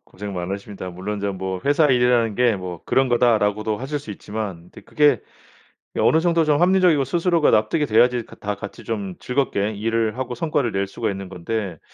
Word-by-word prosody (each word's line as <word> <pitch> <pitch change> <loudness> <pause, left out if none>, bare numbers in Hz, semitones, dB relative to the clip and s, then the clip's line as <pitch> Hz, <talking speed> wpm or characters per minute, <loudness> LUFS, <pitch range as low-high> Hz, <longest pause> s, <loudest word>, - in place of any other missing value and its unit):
고생 100 +1 -8
많으십니다. 95 +1 -5
물론 100 +3 -5
저 100 -1 -1
뭐 95 -1 -4
"회사 145 +2 +4
일이라는 125 -4 +3
게 120 -2 +2
뭐 90 -3 -7
그런 130 -1 +2
거다."라고도 110 -3 +2
하실 140 +3 -3
수 125 -7 -10
있지만 100 -4 -5
근데 - - -13
그게 145 -6 +2 0.8
예 - - 0
어느 160 - +4
정도 170 -1 +2
좀 150 0 +2
합리적이고 180 -5 +4
스스로가 170 +2 +2
납득이 130 +9 +2
돼야지 120 +1 +3
가 - - -14
다 105 0 -4
같이 100 0 -9
좀 100 -5 -4
즐겁게 125 -6 -1
일을 115 +2 -1
하고 130 -2 -3
성과를 145 -4 0
낼 100 0 0
수가 110 +3 -3
있는 95 -1 -7
건데 95 -1 -4
110 Hz, 395 characters per minute, -22 LUFS, 100-135 Hz, 0.8 s, 회사